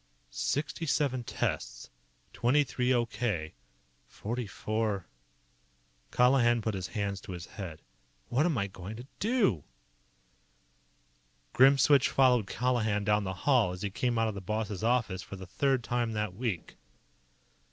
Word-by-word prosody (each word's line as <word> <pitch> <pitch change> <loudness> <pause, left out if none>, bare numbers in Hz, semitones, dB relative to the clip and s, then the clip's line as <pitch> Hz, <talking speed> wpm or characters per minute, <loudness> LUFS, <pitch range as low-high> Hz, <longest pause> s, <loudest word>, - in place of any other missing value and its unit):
"Sixty 150 - -2
seven 130 -4 +1
tests. - - -3 0.4
Twenty 130 +5 +3
three 125 -1 -1
okay. 115 -9 -1 0.5
Forty 120 +2 -4
four 105 -2 -2 0.5
" - - -38
Colihan 125 -1 +5
put 110 - -1
his 95 -2 -3
hands 100 -2 -2
to 95 - -8
his 85 -1 -7
head. 85 -6 -8 0.4
"What 145 +7 +2
am 160 -7 0
I 100 - +1
going 95 +2 -8
to 120 +3 -9
do?" 205 - +2 1.9
Grimswitch 135 +1 +6
followed 125 -6 +4
Colihan 110 -3 0
down 105 0 +2
the 95 - -2
hall 125 -10 +4
as 90 - -7
he 100 - -2
came 120 +4 0
out 115 0 +2
of 110 - -2
the 100 - -6
boss's 105 +1 -3
office 115 -6 +1
for 100 - -9
the 95 -1 -9
third 135 +6 0
time 120 -1 -1
that 105 -3 -2
week. 110 -5 -4
110 Hz, 140 wpm, -30 LUFS, 95-125 Hz, 1.9 s, Grimswitch